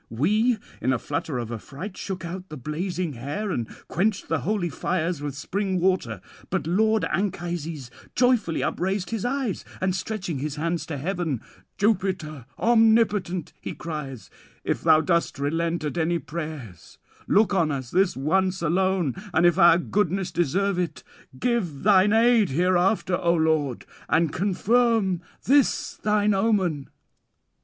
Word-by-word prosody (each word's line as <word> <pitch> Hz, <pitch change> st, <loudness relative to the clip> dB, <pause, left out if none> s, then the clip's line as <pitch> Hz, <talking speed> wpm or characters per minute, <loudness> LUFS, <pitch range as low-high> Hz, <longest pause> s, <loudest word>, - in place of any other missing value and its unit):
We 215 Hz, -, +2 dB, 0.2 s
in 130 Hz, -, +1 dB
a -, -, +1 dB
flutter 145 Hz, +1 st, -3 dB
of 120 Hz, -1 st, -4 dB
affright 145 Hz, -, -7 dB
shook 185 Hz, -3 st, -5 dB
out 180 Hz, +2 st, -7 dB
the 155 Hz, -, -7 dB
blazing 170 Hz, +4 st, -3 dB
hair 145 Hz, -, -4 dB
and 120 Hz, -9 st, -2 dB, 0.2 s
quenched 200 Hz, +2 st, -1 dB
the 160 Hz, -, +1 dB
holy 180 Hz, -, -1 dB
fires 170 Hz, +2 st, -1 dB
with 145 Hz, -2 st, -4 dB
spring 190 Hz, +5 st, -2 dB
water. 170 Hz, -, 0 dB, 0.3 s
But -, -, -1 dB
lord 220 Hz, +6 st, +2 dB
Anchises 170 Hz, -8 st, -3 dB, 0.2 s
joyfully 245 Hz, -9 st, +2 dB
upraised 190 Hz, +1 st, -1 dB
his 225 Hz, -2 st, -2 dB
eyes; 255 Hz, -5 st, -1 dB, 0.2 s
and 185 Hz, -1 st, 0 dB
stretching 185 Hz, -5 st, -3 dB
his 150 Hz, +1 st, -3 dB
hands 165 Hz, 0 st, -2 dB
to 150 Hz, -, -4 dB
heaven: 165 Hz, -, -2 dB, 0.4 s
"Jupiter 180 Hz, -, -1 dB
omnipotent," 220 Hz, -6 st, +3 dB
he -, -, -5 dB
cries, 140 Hz, -, -6 dB, 0.3 s
"if -, -, -1 dB
thou 160 Hz, -1 st, +5 dB
dost 170 Hz, -2 st, 0 dB
relent 165 Hz, +4 st, -1 dB
at 150 Hz, +3 st, -2 dB
any 170 Hz, +1 st, +1 dB
prayers, 150 Hz, -, -7 dB, 0.3 s
look 210 Hz, 0 st, +3 dB
on 170 Hz, -5 st, +2 dB
us 130 Hz, -3 st, -4 dB
this 190 Hz, -4 st, +2 dB
once 185 Hz, +6 st, +1 dB
alone; 180 Hz, -3 st, +1 dB, 0.2 s
and 165 Hz, +2 st, +4 dB
if 175 Hz, +1 st, +4 dB
our 170 Hz, -2 st, +7 dB
goodness 185 Hz, 0 st, -1 dB
deserve 175 Hz, +3 st, 0 dB
it, 155 Hz, -7 st, -3 dB, 0.4 s
give 195 Hz, -, -1 dB
thine 200 Hz, 0 st, +5 dB
aid 225 Hz, -3 st, +4 dB
hereafter, 180 Hz, +4 st, +2 dB
O 170 Hz, 0 st, +2 dB
lord, 155 Hz, -6 st, 0 dB, 0.2 s
and 160 Hz, -1 st, +2 dB
confirm 205 Hz, 0 st, +2 dB, 0.2 s
this 280 Hz, +2 st, +2 dB
thine 210 Hz, 0 st, +2 dB
omen." 190 Hz, -8 st, +1 dB
175 Hz, 145 wpm, -25 LUFS, 155-200 Hz, 0.4 s, our